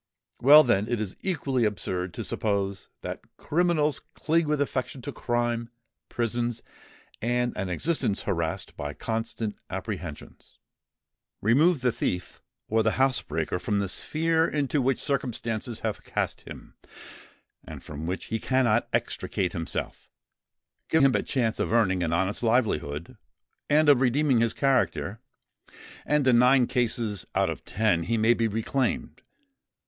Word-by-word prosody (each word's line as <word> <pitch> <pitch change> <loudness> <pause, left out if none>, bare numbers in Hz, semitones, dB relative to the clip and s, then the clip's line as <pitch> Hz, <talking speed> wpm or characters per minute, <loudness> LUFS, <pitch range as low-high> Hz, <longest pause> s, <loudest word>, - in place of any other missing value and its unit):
Well, 150 +4 +9
then, 105 -5 +2
it 120 -2 -1
is 105 -3 -4
equally 135 -9 0
absurd 95 -4 -2
to - - -4
suppose 100 -2 -2
that - - -5 0.2
criminals 155 -3 +1 0.2
cling 160 0 +1
with 150 -1 +1
affection 135 -1 -2
to 145 - -4
crime, 120 -2 -1 0.4
prisons, 120 0 -2 0.6
and 120 +2 0
an 95 - -3
existence 105 - -1
harassed 85 -4 -2
by 75 0 -5
constant 115 -1 -3
apprehensions. - - -7 0.8
Remove 140 - +3
the 125 -1 +2
thief 90 -5 -3 0.3
or 110 +1 +2
the 110 0 +1
housebreaker 90 - 0
from 105 +2 -1
the 100 -1 0
sphere 160 - +1
into 145 -1 0
which 130 0 +1
circumstances 120 -4 -2
have - - -3
cast - - -3
him, - - -11 0.9
and - - -10
from 75 +2 -7
which 90 +2 -3
he 115 - 0
cannot 120 -2 +2
extricate 90 -3 -1
himself,—give 110 - -4
him 135 -2 +5
a - - +2
chance 115 -4 -1
of - - -1
earning 95 -6 +2
an 85 -2 0
honest 95 +4 0
livelihood, 105 - 0 0.5
and 155 +1 +4
of 140 -3 +6
redeeming 135 0 +3
his 115 -1 +1
character,—and 135 +2 -2
in 120 -2 +6
nine 125 +1 +5
cases 115 -5 0
out - - +2
of - - -7
ten, 105 -6 +1
he 115 +6 0
may 110 +2 +4
be 115 -1 +1
reclaimed. 115 +4 -2
120 Hz, 135 wpm, -27 LUFS, 105-135 Hz, 0.9 s, Well